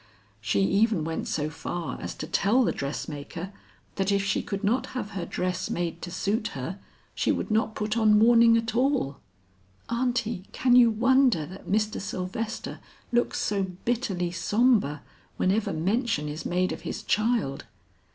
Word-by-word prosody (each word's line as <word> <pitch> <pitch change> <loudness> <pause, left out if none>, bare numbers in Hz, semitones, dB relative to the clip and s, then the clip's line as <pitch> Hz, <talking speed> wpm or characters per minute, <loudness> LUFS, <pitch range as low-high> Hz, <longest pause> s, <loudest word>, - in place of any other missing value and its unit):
She 105 -2 +1
even 200 - +2
went 160 +1 -3
so 155 0 -1
far 170 +2 -5
as - - -5
to - - -5
tell 230 +6 +3
the - - +2
dressmaker 150 +6 -5 0.4
that 195 0 +1
if 200 0 +2
she 195 - 0
could 200 0 -5
not 230 +6 +1
have 215 -4 -4
her 185 -4 -4
dress 185 0 -2
made 170 -1 -2
to 175 - -5
suit 205 +5 -1
her 170 +10 -5 0.3
she - - +1
would - - -2
not 220 0 +1
put 210 +1 -1
on 215 -2 +5
mourning 230 +1 +6
at 230 +1 -2
all! 250 - +1 0.7
Aunty, 235 -4 -1
can 250 -1 +3
you 245 -2 +8
wonder 245 - +3
that 185 +5 -11
Mr. 215 +1 0
Sylvester 205 +4 -4 0.3
looks 240 0 +1
so 205 -1 0 0.2
bitterly 205 -8 -1
sombre 205 - +2 0.3
whenever 200 +4 +1
mention 190 - 0
is 150 +2 -5
made 180 +1 +1
of - - -5
his - - -5
child? 215 - 0
205 Hz, 160 wpm, -27 LUFS, 175-230 Hz, 0.7 s, you